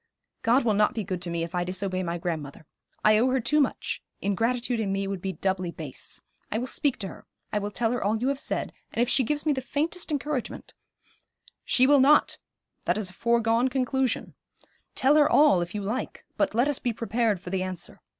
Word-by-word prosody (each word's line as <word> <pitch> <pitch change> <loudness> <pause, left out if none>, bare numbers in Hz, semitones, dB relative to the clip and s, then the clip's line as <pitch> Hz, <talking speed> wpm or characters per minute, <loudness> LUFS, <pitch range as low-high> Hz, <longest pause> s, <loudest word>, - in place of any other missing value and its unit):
'God 240 +3 +3
will 220 - +3
not 210 +1 +2
be 220 - -1
good 185 -2 -4
to 180 - -3
me 170 -1 -1
if 170 +1 -6
I 180 -1 0
disobey 185 +1 -2
my 170 -1 -2
grandmother. 160 -4 -5 0.4
I 215 0 +6
owe 250 +3 +3
her 260 +1 +2
too 300 +6 +2
much; 275 - -1 0.2
ingratitude 235 +4 0
in 205 -3 -1
me 195 0 -1
would 195 -2 -4
be 190 - -2
doubly 185 -2 -1
base. 155 -5 -5 0.3
I 215 - 0
will 240 - -2
speak 280 +1 +1
to 195 - -2
her. - - -12 0.3
I 210 - +2
will 205 0 -3
tell 225 +2 0
her 245 - -1
all 210 +2 +1
you 250 +4 0
have 275 -1 -1
said, - - -2 0.2
and - - -4
if - - -1
she 260 +2 +3
gives 295 +5 -1
me 305 - +3
the 265 - -2
faintest 315 +7 -2
encouragement 290 -3 -3 0.5
' - - -30
'She 255 - +4
will 285 +1 +6
not; 290 +3 +4 0.5
that - - +1
is 200 -4 -2
a - - -18
foregone 235 +3 +2
conclusion. 260 -1 0 0.6
Tell 275 +3 +4
her 295 -1 +5
all, 290 -12 +5
if 175 +3 -5
you 205 - -2
like; 225 +6 -4
but - - 0
let 240 +4 +3
us 290 -3 0
be 240 - -1
prepared 230 -2 0
for 180 0 -8
the 190 -1 0
answer. 185 -2 -6
225 Hz, 225 wpm, -27 LUFS, 190-260 Hz, 0.6 s, I